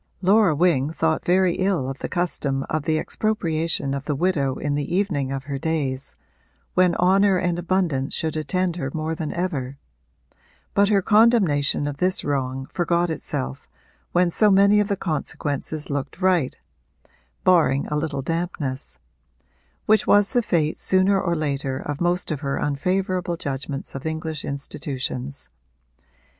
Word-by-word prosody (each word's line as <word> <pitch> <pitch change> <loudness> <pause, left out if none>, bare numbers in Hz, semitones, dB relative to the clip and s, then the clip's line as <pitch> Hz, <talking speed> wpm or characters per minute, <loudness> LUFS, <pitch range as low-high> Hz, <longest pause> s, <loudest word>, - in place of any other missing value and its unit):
Laura 195 -3 +4
Wing 155 -4 +2
thought 160 -1 0
very 180 0 +3
ill 185 -8 0
of 135 0 -5
the - - -4
custom 150 -6 -1
of 155 -2 -1
the 155 -1 +1
expropriation 165 -8 -1
of 140 0 -4
the 150 - -1
widow 140 -5 0
in 145 +2 -2
the 145 +4 -2
evening 160 -9 0
of 135 -1 -3
her 140 0 -4
days, 140 - -2 0.6
when 180 -1 +3
honour 190 +2 +4
and 175 -1 0
abundance 170 -7 0
should 160 -2 -2
attend 180 +3 -1
her 135 -5 -3
more 160 +1 -2
than 160 -2 -4
ever; 140 -7 -3 1.0
but 200 0 +3
her 200 -3 +3
condemnation 200 -12 +3
of 145 -1 -4
this 185 +4 +1
wrong 135 -2 -2
forgot 175 0 +1
itself 65 - -4 0.4
when 175 0 +2
so 215 +4 +4
many 200 +1 +5
of 205 - +2
the 200 -1 -1
consequences 150 -2 -3
looked 140 +3 -4
right 180 -8 +2 0.9
barring 160 -7 +3
a 150 - -3
little 150 -3 -2
dampness: 165 -5 -3 0.9
which 215 -1 +3
was 205 +2 +4
the 245 - +3
fate 160 -8 0
sooner 190 +1 +3
or 170 -1 0
later 140 -3 -2
of 145 +2 -5
most 175 0 0
of 150 - -2
her 140 -2 -2
unfavourable 180 +4 -1
judgments 140 -1 -5
of 135 +3 -5
English 160 -1 -4
institutions. 140 -1 -5
160 Hz, 150 wpm, -23 LUFS, 140-185 Hz, 1.0 s, many